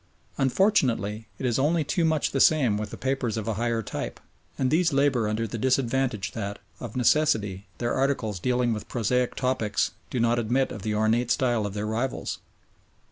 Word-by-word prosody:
Unfortunately 125 - +2
it 130 - -4
is 120 0 +1
only 155 +4 +2
too 170 +4 0
much 160 -2 +1
the 135 - -1
same 135 -8 +4
with 105 0 -3
the - - -8
papers 130 -4 -1
of 110 0 -4
a 115 - 0
higher 115 +1 -1
type, - - -5 0.4
and 130 -1 +1
these 165 +1 +3
labour 135 -5 +2
under 110 +2 -1
the 115 +1 -5
disadvantage 130 -3 0
that, 100 -2 -4 0.2
of 120 -3 -7
necessity, 110 -7 +2
their 120 - -1
articles 130 -7 0
dealing 125 +3 +1
with 105 - -6
prosaic 125 +1 0
topics 125 -5 0 0.2
do 125 - -2
not 120 +1 +2
admit 125 +4 +1
of 105 - -7
the 105 +1 -2
ornate 110 +3 +2
style 120 -4 +1
of 100 - -7
their 105 0 -2
rivals. 115 +4 -2
120 Hz, 185 wpm, -26 LUFS, 110-135 Hz, 0.4 s, same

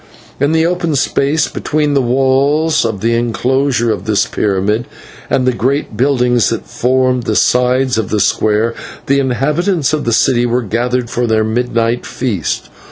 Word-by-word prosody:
In 145 +2 +1
the 160 0 +2
open 170 -3 -1
space 140 +3 +1
between 150 -1 -1
the 140 - +2
walls 135 +5 +1
of 110 -4 -3
the 115 +1 +1
inclosure 120 +1 0
of 100 -3 -4
this 110 -2 +1
pyramid 105 +3 -1 0.4
and 130 - +1
the 130 - +3
great 130 0 -1
buildings 125 -2 +2
that 115 - -4
formed 130 0 0
the 110 - -1
sides 125 +1 +2
of 110 - -3
the 105 - 0
square, 110 +3 +1 0.3
the 140 +1 +2
inhabitants 150 +5 0
of 155 - -1
the 115 - 0
city 120 +1 +2
were 120 +1 0
gathered 120 +3 -2
for 120 0 -1
their 110 -1 +2
midnight 115 +1 -1
feast. 110 - -3
125 Hz, 165 wpm, -14 LUFS, 115-140 Hz, 0.4 s, the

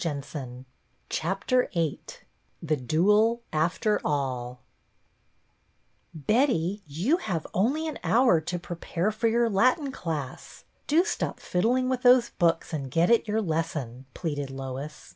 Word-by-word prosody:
VIII 140 -5 -5 1.9
THE 155 -2 0
DUEL 210 - +2
— - - -39
AFTER 175 +7 +1
ALL 125 -4 -2 0.8
" 155 -5 -20
T^ETTY, 210 - +2
you 180 - +1
have 180 - -3
only 275 - +1
an 310 - -5
hour 235 -9 +4
to 175 +3 -4
I - - -2
prepare 175 +3 -2
for 225 +2 0
your 235 +1 +3
Latin 255 - +2
class. 155 - -6 0.2
Do 320 +4 +4
stop 430 - -2
fiddling 245 +8 +1
with 255 -1 -1
those 245 -1 +5
books 170 -1 0
and 140 -4 -3
get 165 - +2
at 230 -1 +3
your 215 +1 0
lesson," 150 - -3
pleaded 145 -5 -3
Lois. 135 +2 -7
175 Hz, 130 wpm, -27 LUFS, 145-230 Hz, 1.9 s, those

